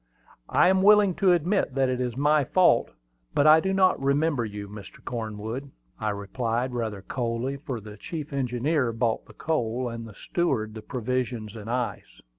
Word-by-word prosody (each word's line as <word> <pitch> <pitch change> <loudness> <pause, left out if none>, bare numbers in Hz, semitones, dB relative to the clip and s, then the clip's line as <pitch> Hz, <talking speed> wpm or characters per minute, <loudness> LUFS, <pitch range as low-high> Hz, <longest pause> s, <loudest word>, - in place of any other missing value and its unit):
"I - - +4
am 190 0 +3
willing 205 -1 +6
to 190 -2 +4
admit 175 -3 +1
that 135 -1 +3
it 125 0 -1
is 125 -1 -2
my 150 +1 +3
fault, 180 +7 +3 0.5
but 145 - +3
I 155 +1 +8
do 190 +4 -1
not 190 -5 +3
remember 140 -1 +1
you, 105 -2 -6
Mr. 100 -1 -10
Cornwood," 115 +3 -5 0.3
I 110 - -1
replied, 115 +4 -2
rather 110 -5 -3
coldly, 120 +2 -2
for 135 -4 -5
the 105 0 -11
chief 150 - -6
engineer 130 0 0
bought 115 0 -1
the - - -14
coal, 125 -5 -1
and 115 0 -6
the 105 - -13
steward 125 -12 -1
the 110 - -7
provisions 120 -2 -3
and 110 0 -8
ice. 115 - -3
125 Hz, 175 wpm, -26 LUFS, 110-150 Hz, 0.5 s, I